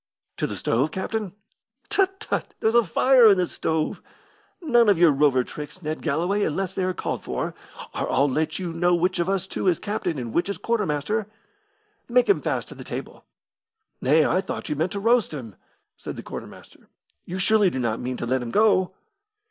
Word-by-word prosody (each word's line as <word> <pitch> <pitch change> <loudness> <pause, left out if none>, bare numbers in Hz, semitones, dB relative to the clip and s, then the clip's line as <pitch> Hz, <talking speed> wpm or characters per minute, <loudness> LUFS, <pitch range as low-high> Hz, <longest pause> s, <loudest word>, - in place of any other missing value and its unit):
"To - - -1
the - - -5
stove, 130 +7 +1
captain?" 190 +3 -3 0.5
"Tut, 385 0 +1
tut! 435 - -3
there's 220 - +2
a 235 0 +5
fire 245 +5 +5
in 200 - +5
the 180 - +2
stove. 160 -2 -2 0.6
None 240 - +4
of 200 - +4
your 170 -2 +6
rover 135 -2 +3
tricks, 150 +7 -9
Ned 155 +1 -3
Galloway, 175 +7 0
unless 190 +1 -1
they 190 - -2
are 185 0 0
called - - -3
for, - - -3 0.4
or - - -2
I'll 140 +2 +3
let 155 +3 -1
you 175 -3 -4
know 175 +1 +2
which 180 +1 0
of 170 +2 0
us 195 -2 0
two 190 - -3
is 175 -3 +4
captain 205 -6 -3
and 120 -3 -5
which 175 - +1
is 200 - -3
quartermaster. 210 -1 -1 0.8
Make 245 0 +4
him 195 -7 +3
fast - - -2
to - - -8
the - - -10
table." - - -7 0.8
"Nay, 150 +4 +4
I 185 - +2
thought - - -6
you 150 - -1
meant 160 +5 -1
to 200 - -3
roast 230 -5 +2
him!" 115 -7 -7 0.4
said - - -7
the - - -8
quartermaster. - - -10 0.4
"You 180 - -5
surely 205 +1 +3
do 150 - -5
not 115 -3 -1
mean 125 0 -3
to - - -4
let 130 +2 0
him 120 - -5
go?" 190 - +3
180 Hz, 200 wpm, -24 LUFS, 150-210 Hz, 0.8 s, your